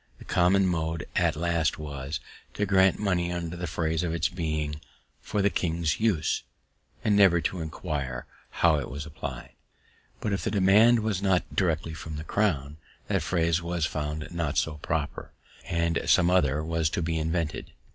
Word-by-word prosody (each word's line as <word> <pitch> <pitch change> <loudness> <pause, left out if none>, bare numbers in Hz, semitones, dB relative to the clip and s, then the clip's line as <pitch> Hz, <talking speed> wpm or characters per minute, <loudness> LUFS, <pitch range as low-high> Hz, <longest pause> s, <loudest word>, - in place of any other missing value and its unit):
The - - -13
common 95 +2 +3
mode 80 -2 -1
at - - +2
last 85 -1 0
was, 75 0 -5 0.4
to 105 - 0
grant 95 -1 +4
money 90 -4 0
under 85 -1 -3
the 90 0 -4
phrase 80 0 -1
of 85 -2 -1
its 80 -1 +1
being 75 -3 -3 0.4
"for 105 - -1
the 100 - +3
king's 80 -3 0
use," 100 -8 +1 0.6
and 105 - +3
never 95 -4 +6
to 85 +2 -2
inquire 70 -5 -4 0.2
how 80 -4 +3
it 65 - -5
was 70 +3 -6
applied. 70 -6 -7 0.7
But, 105 - -1
if 95 - -2
the - - 0
demand 105 +4 +5
was 105 -3 -1
not 95 -3 +1
directly 80 -3 0
from 80 0 -7
the 75 - -5
crown, 75 -6 0 0.3
that - - +1
phrase 85 -1 +1
was 85 -2 -1
found 75 0 -4
not 85 -4 -2
so 75 -2 0
proper, 75 0 -3 0.3
and 85 -1 0
some 85 +1 +5
other 75 -5 +2
was 80 -1 0
to 85 - -2
be 80 0 -1
invented. 80 0 -2
85 Hz, 170 wpm, -27 LUFS, 75-90 Hz, 0.7 s, never